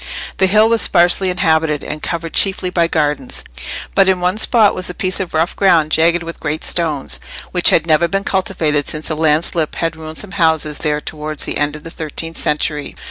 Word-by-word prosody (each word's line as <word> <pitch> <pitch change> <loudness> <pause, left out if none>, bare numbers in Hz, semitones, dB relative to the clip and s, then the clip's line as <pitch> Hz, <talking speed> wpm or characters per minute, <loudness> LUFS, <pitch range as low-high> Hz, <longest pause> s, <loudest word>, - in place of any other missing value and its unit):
The 190 - +3
hill 215 +3 +5
was 230 -1 +3
sparsely 175 +1 +3
inhabited, 160 -4 +1
and 150 0 -6
covered 165 -1 -4
chiefly 190 -2 +1
by 170 -2 +2
gardens; 150 -5 -1 0.5
but 195 -1 +4
in 185 -1 +2
one 180 +4 0
spot 220 -3 +4
was 185 0 -2
a 180 - -7
piece 185 0 -2
of 185 -4 -4
rough 165 +3 0
ground 165 -6 +3
jagged 170 +2 +3
with 165 0 -8
great 155 +1 -3
stones, 155 -5 -1 0.3
which 180 -1 +5
had 165 - +3
never 165 +1 +3
been 195 +3 -2
cultivated 160 -7 0
since 155 +1 -4
a - - -1
landslip 155 +1 0
had 165 -1 -2
ruined 160 0 -9
some 205 - -2
houses 160 -5 +1
there 150 -1 0
towards 155 0 -4
the - - -3
end 145 0 0
of 150 - -11
the 165 - -9
thirteenth 165 +1 -6
century. 150 -1 -1
165 Hz, 200 wpm, -16 LUFS, 155-185 Hz, 0.5 s, hill